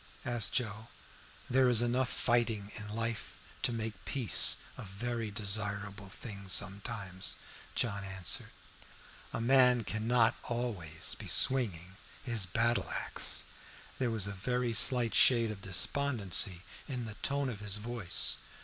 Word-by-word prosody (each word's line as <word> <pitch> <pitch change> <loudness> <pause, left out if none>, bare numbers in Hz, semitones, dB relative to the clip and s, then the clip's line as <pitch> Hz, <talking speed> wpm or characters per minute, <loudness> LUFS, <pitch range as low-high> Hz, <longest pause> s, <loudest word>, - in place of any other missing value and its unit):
asked 120 -4 -1
Joe. 110 -2 -2 0.6
"There 130 0 +3
is 120 -1 +4
enough 125 +1 0
fighting 115 -4 0
in 105 -1 -7
life 115 +1 -4 0.2
to - - +1
make 110 -3 -5
peace 130 -6 +4 0.2
a - - -9
very 115 +3 -5
desirable 100 -1 -4
thing 100 -1 -9
sometimes," 95 0 -2 0.4
John 100 -4 -2
answered. 95 -2 0 0.8
"A - - -4
man 125 0 +4
cannot 115 +3 +1
be - - -13
always 105 -10 -2
swinging 95 -8 +3 0.3
his 115 -8 +1
battle 115 +5 0
axe." - - +1 0.6
There 130 -2 0
was 110 -4 -1
a 100 - -3
very 120 +5 -2
slight 120 -2 +5
shade 115 -3 +5
of 100 -2 -9
despondency 100 -3 +1 0.2
in 125 -4 -4
the 110 - -7
tone 140 0 -1
of 115 -5 -5
his 105 -1 0
voice. 115 -3 +1
110 Hz, 130 wpm, -32 LUFS, 100-120 Hz, 0.8 s, slight